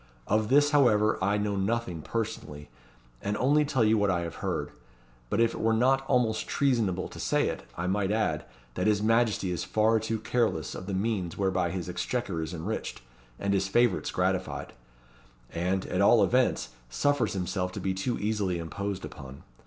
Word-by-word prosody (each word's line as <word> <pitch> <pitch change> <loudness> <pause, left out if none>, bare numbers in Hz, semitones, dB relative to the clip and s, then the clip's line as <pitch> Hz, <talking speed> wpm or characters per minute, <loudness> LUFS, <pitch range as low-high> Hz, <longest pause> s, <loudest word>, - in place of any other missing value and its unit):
Of 105 +1 +1
this, 145 +2 +5
however, 110 -8 +3
I 100 +2 +2
know 105 -1 -1
nothing 95 -4 -1
personally, 75 - -5 0.5
and 105 +1 -2
only 145 +4 +3
tell 140 -5 +1
you 110 0 +4
what 100 -1 +2
I 90 -2 +1
have 85 -1 -5
heard. - - -2 0.6
But 105 - 0
if 115 0 +3
it - - -6
were 110 0 +3
not 135 +4 +3
almost 115 -4 +1
treasonable 115 -10 +1
to - - -11
say - - +1
it, - - -6
I 85 - -2
might 95 +1 0
add, 105 -9 0 0.3
that 90 - -1
his 105 -1 +2
Majesty 115 -4 +2
is 90 - -2
far 110 +1 +2
too 110 +1 -2
careless 110 - -1
of 95 - -7
the 100 - -2
means 95 -4 -1
whereby 95 -3 +1
his 90 -1 -4
exchequer 95 -1 -2
is 80 0 -4
enriched, 85 - -4 0.3
and 100 0 -1
his 95 0 +1
favourites 120 +4 +2
gratified; - - -1 0.8
and, 90 +3 -1
at - - -1
all - - +6
events, - - +2 0.2
suffers 145 - +1
himself 90 -1 -2
to - - -5
be 95 - -1
too 95 +6 -2
easily 105 -4 -1
imposed 95 +4 -4
upon. 65 0 -10
105 Hz, 180 wpm, -28 LUFS, 90-115 Hz, 0.8 s, all